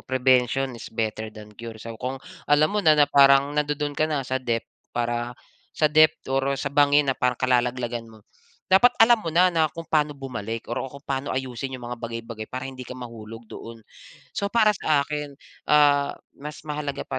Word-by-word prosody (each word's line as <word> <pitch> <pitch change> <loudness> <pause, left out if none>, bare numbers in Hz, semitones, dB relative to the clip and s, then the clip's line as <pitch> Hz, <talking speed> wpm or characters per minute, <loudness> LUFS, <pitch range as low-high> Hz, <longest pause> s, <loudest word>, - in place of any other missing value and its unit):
prevention 130 0 +1
is 115 0 -9
better 110 -1 -3
than 105 -1 -13
cure. 115 +1 -9
So 115 +1 -8
kung 130 +1 -3 0.3
alam 150 +4 +4
mo 210 - +1
na 155 -4 +5
na 145 - +6
parang 140 0 +5
nandodon 145 0 -1
ka 155 +2 0
na 145 -4 -1
sa 130 +1 -2
depth 115 -2 -2 0.3
para 120 0 -2 0.4
sa 150 -1 +2
depth 155 0 +4
or 135 +1 +1
sa 140 +1 -4
bangin 145 -1 +4
na - - -14
parang 125 -1 +1
kalalaglagan 120 -2 0
mo. 110 -2 -17 0.5
Dapat 245 +6 +5
alam 235 0 +6
mo 170 - -5
na, 180 +1 +5
na 160 -2 +3
kung 165 +2 -9
pano 150 -2 +1
bumalik 115 -5 -5
or - - -1
o 135 - -4
kung 140 +2 -13
paano 135 0 -3
ayusin 130 0 -4
yung 125 - -11
mga 120 - -5
bagay-bagay 115 -1 -6
para 130 0 -5
hindi 130 -2 -8
ka 125 - -7
mahulog 115 -2 -9
doon. 115 -1 -10 0.5
So, 200 - -2
para 215 0 +4
sa 150 -2 +2
akin, 150 -1 -5 0.3
ah, 145 -1 +4 0.2
mas 150 +2 -8
mahalaga 145 -2 -4
pa - - -5
135 Hz, 195 wpm, -24 LUFS, 120-150 Hz, 0.5 s, na